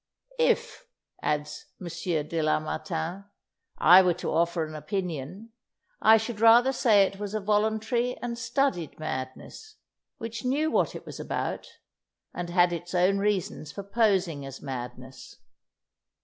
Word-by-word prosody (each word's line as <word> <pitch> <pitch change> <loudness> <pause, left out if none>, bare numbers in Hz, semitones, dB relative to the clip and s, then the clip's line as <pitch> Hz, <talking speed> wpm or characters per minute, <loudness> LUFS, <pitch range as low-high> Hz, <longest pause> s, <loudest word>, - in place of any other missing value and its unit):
"If," 485 0 0 0.3
adds 150 0 -3
M. 185 - -8 0.4
de 165 0 -2
Lamartine, 160 +4 -2 0.5
"I 180 +4 +8
were 180 -2 +2
to - - -4
offer 170 0 +1
an 155 - -9
opinion, 175 +4 -5 0.5
I 220 0 +7
should 220 0 -4
rather 235 +4 +6
say 215 -6 +5
it 195 0 -3
was 205 0 -4
a - - 0
voluntary 220 +4 0
and 240 -1 -4
studied 235 - -1
madness, 155 - -6 0.4
which 230 +1 -6
knew 290 +5 +1
what - - +1
it - - -8
was - - -9
about, - - -3 0.7
and 175 -1 -5
had 175 0 +3
its 175 +2 -5
own 185 +3 +3
reasons 195 -6 -1
for 200 - -7
posing 195 -8 +1
as 135 -1 -8
madness. 130 -1 -8
190 Hz, 135 wpm, -27 LUFS, 160-225 Hz, 0.7 s, I